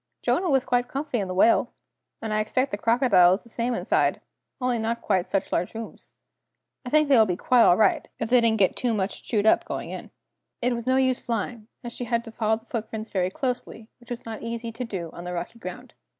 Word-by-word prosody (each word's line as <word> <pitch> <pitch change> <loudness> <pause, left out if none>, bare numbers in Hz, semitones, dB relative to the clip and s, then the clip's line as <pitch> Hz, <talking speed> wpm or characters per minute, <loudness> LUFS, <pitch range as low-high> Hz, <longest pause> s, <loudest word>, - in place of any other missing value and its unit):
"Jonah 365 -1 +1
was 270 -2 +2
quite 245 -1 +1
comfy 275 -1 -3
in 195 - -2
the 185 - -4
whale! 225 +5 +4 0.5
And 220 -1 -2
I 215 - +2
expect 255 +5 0
the 205 - -2
crocodile 225 -7 +5
is 195 - -9
the 235 - -14
same 235 +2 -1
inside, - - +1 0.4
only 250 -2 0
not 230 +1 -1
quite 185 -3 0
such 195 - -1
large 175 +5 -1
rooms! 225 0 -8 0.7
I 250 - -6
think 305 +2 +4
they 280 - +5
will 220 -2 +6
be 180 - 0
quite 250 +4 +3
all 175 - +6
right, 220 - +2
if 225 - -2
they 250 -1 +6
didn't 225 -1 +3
get 190 -3 +3
too 240 -3 0
much 195 -1 -2
chewed 210 -3 -1
up 220 - +5
going - - -5
in!" - - -7 0.5
It 250 0 +1
was 235 0 -5
no 260 - +3
use 260 -1 +2
flying, 225 -1 -3 0.2
as 240 -1 -6
she 245 - -5
had 235 0 0
to 225 - -10
follow 220 -1 0
the 225 - -19
footprints 220 -1 -5
very 185 -2 0
closely, 240 -1 -4
which 240 - -19
was 240 -1 -6
not 225 -1 -6
easy 230 0 -4
to 230 +3 -5
do 185 -8 -5
on 175 - -9
the 180 0 -5
rocky 175 +6 -5
ground. 225 +6 -8
230 Hz, 235 wpm, -25 LUFS, 210-245 Hz, 0.7 s, will